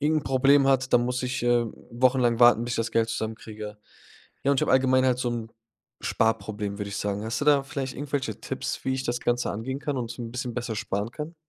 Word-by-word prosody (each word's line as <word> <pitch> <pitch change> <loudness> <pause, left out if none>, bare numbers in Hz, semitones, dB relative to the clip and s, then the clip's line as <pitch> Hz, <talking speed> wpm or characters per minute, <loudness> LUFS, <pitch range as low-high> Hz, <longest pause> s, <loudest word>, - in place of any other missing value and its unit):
irgend 155 +1 +2
'n - - -17
Problem 135 +1 +4
hat, 135 -1 +2
dann 120 - +5
muss 125 +1 -1
ich, 125 -1 -2
ähm, 120 -2 +2 0.2
wochenlang 125 -1 +2
warten, 120 -1 +6
bis 120 - -3
ich - - -1
das 115 0 -1
Geld 115 0 +2
zusammenkriege. 110 -1 -5 0.7
Ja, 140 - +3
und 140 - +2
ich - - -4
habe - - +1
allgemein 130 0 +4
halt 125 -1 +2
so 125 - 0
'n 115 -2 -4 0.5
Sparproblem, 105 -2 -1
würde 100 -1 -3
ich 100 - -4
sagen. 100 0 -2
Hast 115 +4 -3
du - - 0
da 145 -2 +5
vielleicht 135 -1 -4
irgendwelche 135 -5 -3
Tipps, - - -4
wie 130 - +1
ich 130 0 -2
das 120 -1 -1
Ganze 120 0 0
angehen 130 +6 -4
kann 145 -2 -2
und 120 -1 -4
'n 115 -2 -6
bisschen 125 -1 -4
besser 120 -2 -3
sparen 105 -1 -2
kann? 155 +5 -6
120 Hz, 235 wpm, -26 LUFS, 115-130 Hz, 0.7 s, warten